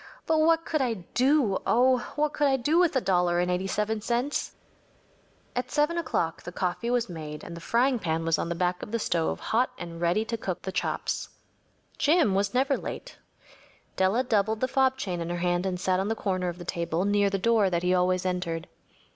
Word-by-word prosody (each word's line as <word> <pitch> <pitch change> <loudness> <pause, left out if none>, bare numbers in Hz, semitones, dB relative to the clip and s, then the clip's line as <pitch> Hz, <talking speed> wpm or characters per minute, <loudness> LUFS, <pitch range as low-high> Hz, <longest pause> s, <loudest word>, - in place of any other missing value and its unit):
But 320 -1 +2
what 330 +1 +3
could 310 -3 0
I 245 -3 0 0.2
do‚ÄĒoh! 255 -1 +3 0.2
what 300 0 +1
could 290 - +2
I 270 -1 +3
do 295 +7 +2
with 350 -5 +3
a 260 - +3
dollar 180 -2 +2
and 180 0 +1
eighty 180 +2 -1
seven 210 +2 -1
cents?‚ÄĚ 245 +6 -1 1.0
At 250 - -2
7 300 +3 +1
o’clock 170 - -1
the 175 - -8
coffee 180 +6 -2
was 245 -1 +1
made 155 -4 -7
and 170 - -8
the 170 - -9
frying 245 +6 +2
pan 165 -3 -1
was 165 -1 +2
on - - -2
the 170 - -2
back 180 +1 -1
of - - -7
the 230 - +1
stove 170 -7 -1
hot 245 +3 +1
and 170 -1 -8
ready 175 +6 +2
to 230 +1 -3
cook 185 -5 -4
the 190 - -4
chops. - - -2 0.7
Jim 305 - +3
was 200 +1 +1
never 270 +2 +2
late. - - -7 0.8
Della 190 +7 +2
doubled 220 -3 +1
the 255 - +2
fob 265 0 +2
chain 180 -8 -3
in 170 - -4
her 175 - -2
hand 175 +1 0
and 180 -1 -2
sat 185 0 +1
on 195 - -1
the 225 - 0
corner 185 -4 -1
of 175 - -6
the 175 - -9
table 170 0 -1
near 205 0 +3
the 195 - -1
door 215 0 +3
that 170 -1 -1
he 180 0 +2
always 185 0 +1
entered. 180 -2 -2
200 Hz, 215 wpm, -27 LUFS, 180-250 Hz, 1.0 s, what